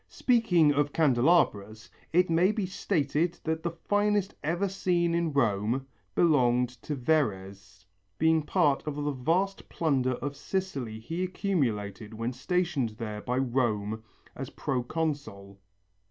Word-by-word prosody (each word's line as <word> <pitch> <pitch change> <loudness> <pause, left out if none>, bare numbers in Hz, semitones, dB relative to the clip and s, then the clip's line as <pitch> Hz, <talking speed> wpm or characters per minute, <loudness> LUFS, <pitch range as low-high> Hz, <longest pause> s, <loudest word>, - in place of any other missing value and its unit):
Speaking 180 - +3
of 145 0 +1
candelabras, 120 - +2 0.2
it 180 +2 +4
may 170 +4 +3
be 215 -3 -2
stated 165 -3 -1
that 160 0 -1
the 170 - -1
finest 205 +3 0
ever 175 +6 0
seen 175 -3 0
in 170 -1 0
Rome 120 -1 +1 0.3
belonged 125 -7 +3
to 150 - -4
Verres, 100 - -2 0.3
being 160 0 +3
part 150 -3 +2
of 150 - -2
the 145 0 -1
vast 170 +9 -1
plunder 135 -6 +1
of 140 +3 -4
Sicily 140 - -3
he 165 +10 -4
accumulated 115 - -2
when 115 +3 -3
stationed 160 -2 0
there 105 -2 -5
by 125 +3 -2
Rome 115 -5 0 0.3
as - - -6
proconsul. 125 -7 -3
145 Hz, 125 wpm, -28 LUFS, 120-170 Hz, 0.3 s, it